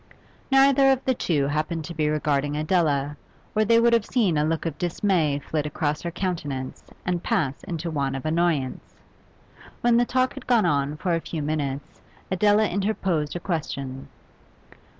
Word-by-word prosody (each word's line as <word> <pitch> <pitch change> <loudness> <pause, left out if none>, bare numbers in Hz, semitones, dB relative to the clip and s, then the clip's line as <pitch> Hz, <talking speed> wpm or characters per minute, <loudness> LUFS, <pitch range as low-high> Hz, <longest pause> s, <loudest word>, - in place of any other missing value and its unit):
Neither 270 0 +5
of 265 0 0
the 260 - +3
two 155 - 0
happened 155 +3 -1
to 170 - -6
be 155 -2 0
regarding 145 -1 0
Adela, 150 -3 +1 0.4
or 215 - +4
they 230 +2 +4
would 235 0 +4
have 230 -3 +2
seen 210 -10 +2
a 150 - +2
look 160 +2 -1
of 160 -3 -4
dismay 175 -4 +1
flit 150 +1 -3
across 150 0 -2
her 170 - -3
countenance 150 -8 -4 0.2
and 175 -1 -1
pass 135 -5 -1
into 170 -2 -4
one 140 -3 -1
of 135 - -6
annoyance. 155 -4 -1 0.9
When 240 -1 +4
the 240 - +4
talk 255 +1 +1
had 275 -2 -10
gone 235 -6 +4
on 145 -2 0
for 175 +3 -1
a 165 - 0
few 160 -2 -4
minutes 145 -2 -3 0.3
Adela 210 +3 +4
interposed 185 -6 -1
a - - -2
question. 140 -7 -4
165 Hz, 170 wpm, -25 LUFS, 145-200 Hz, 0.9 s, Neither